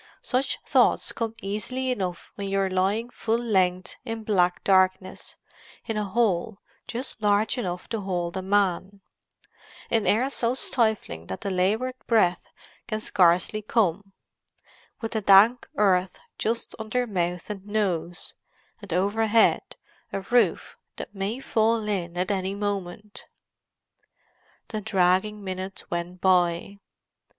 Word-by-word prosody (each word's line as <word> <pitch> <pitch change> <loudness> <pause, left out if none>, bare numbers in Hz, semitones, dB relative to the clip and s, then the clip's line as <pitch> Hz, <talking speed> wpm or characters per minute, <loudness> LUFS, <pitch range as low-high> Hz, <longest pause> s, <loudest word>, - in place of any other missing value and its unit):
Such 255 +1 0
thoughts - - +3
come 225 -1 -3
easily 255 +6 -2
enough 185 -7 -4
when 200 -1 -5
you 195 - 0
are 190 -1 0
lying 200 +6 0
full 225 -1 -1
length 185 -6 0
in 225 -2 -5
black 180 -4 +1
darkness, 185 -1 +1 0.5
in 225 - -3
a 210 -1 -1
hole 205 -1 0 0.3
just 245 -1 -4
large 210 +2 +2
enough 180 -8 -4
to 225 -2 -2
hold 180 -2 -2
a 190 - -2
man; 195 0 0 0.9
in 225 -2 +2
air 235 +5 +3
so 240 -2 0
stifling 220 - 0
that 95 - -6
the 200 - -3
laboured 210 +8 +1
breath 185 -6 +2 0.4
can 215 -2 -2
scarcely 185 +1 +2
come; 200 -3 0 0.9
with 225 - -3
the 220 - -1
dank 205 +5 +6
earth 185 -3 +2 0.2
just 230 +2 -2
under 220 +3 -1
mouth 180 -5 -2
and 200 -1 -8
nose, 175 -5 -2 0.5
and 200 -3 -10
overhead 215 +4 +2 0.4
a 195 - -3
roof 240 +5 +1 0.2
that - - -8
may 200 +5 -3
fall 225 -3 +1
in 175 -4 -2
at 185 +3 0
any 190 0 -1
moment. 205 0 -4 1.4
The 215 -2 -4
dragging 190 +2 +1
minutes 190 0 -6
went 175 +1 -4
by. 180 +1 +2
200 Hz, 130 wpm, -26 LUFS, 185-220 Hz, 1.4 s, dank